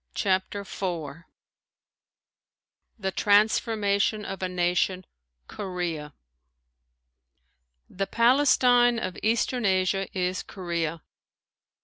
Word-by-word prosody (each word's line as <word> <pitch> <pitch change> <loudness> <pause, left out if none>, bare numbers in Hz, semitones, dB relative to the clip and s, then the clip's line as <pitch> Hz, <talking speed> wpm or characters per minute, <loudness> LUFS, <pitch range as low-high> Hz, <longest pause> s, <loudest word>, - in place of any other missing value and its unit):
CHAPTER 190 0 0
IV 170 -5 -5 1.7
THE 190 -3 -3
TRANSFORMATION 210 0 +2
OF 195 - -6
A 185 - -1
NATION 180 +1 0 0.4
KOREA 175 -6 -5 1.7
The 195 +1 -4
Palestine 245 -1 +4
of 185 -5 -4
eastern 235 +2 0
Asia 190 0 +1
is 180 0 -1
Korea. 170 -4 -4
190 Hz, 75 wpm, -26 LUFS, 180-215 Hz, 1.7 s, Palestine